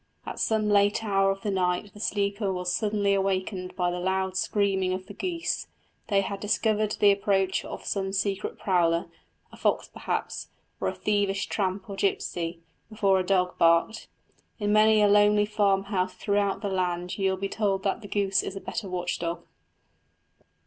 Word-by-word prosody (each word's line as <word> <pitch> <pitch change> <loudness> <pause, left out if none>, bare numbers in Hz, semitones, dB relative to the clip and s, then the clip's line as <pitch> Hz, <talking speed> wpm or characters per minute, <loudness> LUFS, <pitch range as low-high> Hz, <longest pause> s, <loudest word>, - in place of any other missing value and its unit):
At - - -6
some 220 -1 +1
late 205 +1 +3
hour 195 -2 +2
of 195 0 -2
the 210 - -2
night 185 +1 -1
the 210 - -13
sleeper 200 -1 -1
was 180 -1 -2
suddenly 205 -1 +1
awakened 190 -1 -1
by 180 -2 0
the 180 - -3
loud 190 +1 -1
screaming 190 -1 +1
of 185 0 -4
the 205 - -10
geese; 340 - -3 0.4
they 200 -2 +3
had 195 0 -4
discovered 215 0 +1
the 205 -1 +5
approach 195 -1 +1
of - - -8
some 195 -1 -1
secret 200 0 -2
prowler, 170 -3 +1 0.4
a - - -13
fox - - 0
perhaps, - - -3 0.3
or - - -1
a - - -2
thievish 200 -1 0
tramp 190 -1 -2
or 200 - -6
gipsy, 180 - -2 0.3
before 200 -3 +2
a - - 0
dog 180 -1 +1
barked. 170 +7 +3 0.5
In 210 -1 0
many 215 0 +5
a - - +6
lonely 210 0 +5
farmhouse 195 -2 0
throughout 200 -1 0
the - - 0
land 180 -1 -2
you 195 -1 +2
will 190 - -1
be 195 +1 -2
told 195 -2 -1
that 200 +3 -1
the 205 - -9
goose 195 -1 +1
is 195 - -6
the - - -4
better 195 0 -5
watch 180 -1 -2
dog. 170 0 -4
195 Hz, 175 wpm, -27 LUFS, 185-205 Hz, 0.5 s, a